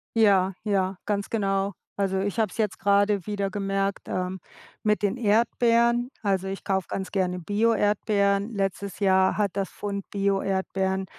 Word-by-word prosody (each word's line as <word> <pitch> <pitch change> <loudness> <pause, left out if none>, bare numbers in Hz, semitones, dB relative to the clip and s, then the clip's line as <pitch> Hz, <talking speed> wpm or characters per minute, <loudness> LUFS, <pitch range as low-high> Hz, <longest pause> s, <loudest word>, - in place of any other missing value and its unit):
Ja, 195 -4 +4
ja, 195 -2 0
ganz 200 -1 -1
genau. 195 -2 0 0.2
Also, 195 -1 0
ich 200 +2 -2
habe 215 -3 +2
es - - -11
jetzt 215 -3 -1
grade 200 -1 +2
wieder 200 -2 -1
gemerkt, 195 0 -2
ähm, 185 0 -3 0.4
mit 210 -1 +1
den 205 +4 +1
Erdbeeren. 235 +2 +2
Also, 195 -3 0
ich 195 0 -5
kaufe 190 -2 0
ganz 190 -1 -4
gerne 180 -2 0
Bio-Erdbeeren. 205 +1 +1
Letztes 195 -1 -3
Jahr 190 -1 +3
hat 205 -3 +1
das 195 -1 -2
Pfund 200 -1 -5
Bio-Erdbeeren 195 -1 0
200 Hz, 150 wpm, -26 LUFS, 190-210 Hz, 0.4 s, Ja